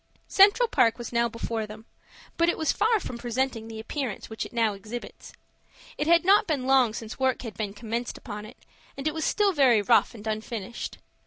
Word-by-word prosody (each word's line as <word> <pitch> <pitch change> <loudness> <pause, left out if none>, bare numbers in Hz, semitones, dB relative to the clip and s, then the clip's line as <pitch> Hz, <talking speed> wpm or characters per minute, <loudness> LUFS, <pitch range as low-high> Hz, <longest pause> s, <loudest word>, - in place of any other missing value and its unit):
Central 405 +5 +6
Park 230 - +3
was 240 0 -7
now 235 0 +2
before 225 -1 -4
them, 215 +1 -11 0.5
but 335 0 +3
it - - 0
was 315 - +1
far 445 0 +2
from 245 -10 -7
presenting 240 -1 -2
the 225 -1 -8
appearance 235 -2 -5
which 220 - -4
it - - -22
now 230 -3 +1
exhibits. 215 +5 -9 0.6
It 300 - -2
had 340 +1 +5
not 395 +2 +5
been 285 -6 -1
long 260 -4 +4
since 220 +2 -7
work 260 -1 +1
had 225 -3 -6
been 205 0 -4
commenced 235 +2 -4
upon 210 -3 -8
it, 240 - -14 0.4
and 275 +2 -3
it 310 - 0
was 315 0 -2
still 410 -2 +2
very 255 -8 +4
rough 235 +2 +3
and 215 -1 -11
unfinished. 220 +1 -4
235 Hz, 200 wpm, -26 LUFS, 220-290 Hz, 0.6 s, Central